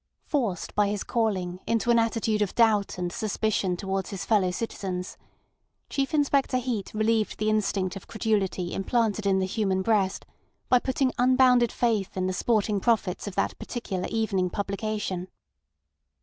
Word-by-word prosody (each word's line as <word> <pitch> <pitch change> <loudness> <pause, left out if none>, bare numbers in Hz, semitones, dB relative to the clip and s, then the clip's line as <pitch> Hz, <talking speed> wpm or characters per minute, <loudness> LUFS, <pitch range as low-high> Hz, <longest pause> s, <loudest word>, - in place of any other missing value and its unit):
Forced 230 - -1
by 210 0 +3
his 205 -1 -2
calling 190 -6 -1
into 230 +1 +2
an 235 - +5
attitude 225 -1 0
of 205 - -1
doubt 215 -5 +3
and 175 -1 -2
suspicion 215 -4 -1
towards 195 0 -2
his 190 -5 -5
fellow 200 -3 +3
citizens, 185 -2 -4 0.8
Chief 275 -1 -1
Inspector 280 -3 +2
Heat 240 -6 -3
relieved 220 0 +1
the 215 0 +1
instinct 200 -3 0
of 195 - -9
credulity 200 -5 -1
implanted 215 0 0
in 190 -1 +3
the 190 - +1
human 190 -1 0
breast 200 -3 +1 0.4
by 250 - +6
putting 260 +1 0
unbounded 250 -1 +5
faith 220 -6 0
in 185 - 0
the 185 - -1
sporting 210 +1 +1
prophets 205 -4 0
of 195 - -6
that - - 0
particular 195 -7 -4
evening 200 -5 0
publication. 200 -2 -3
210 Hz, 150 wpm, -26 LUFS, 190-230 Hz, 0.8 s, by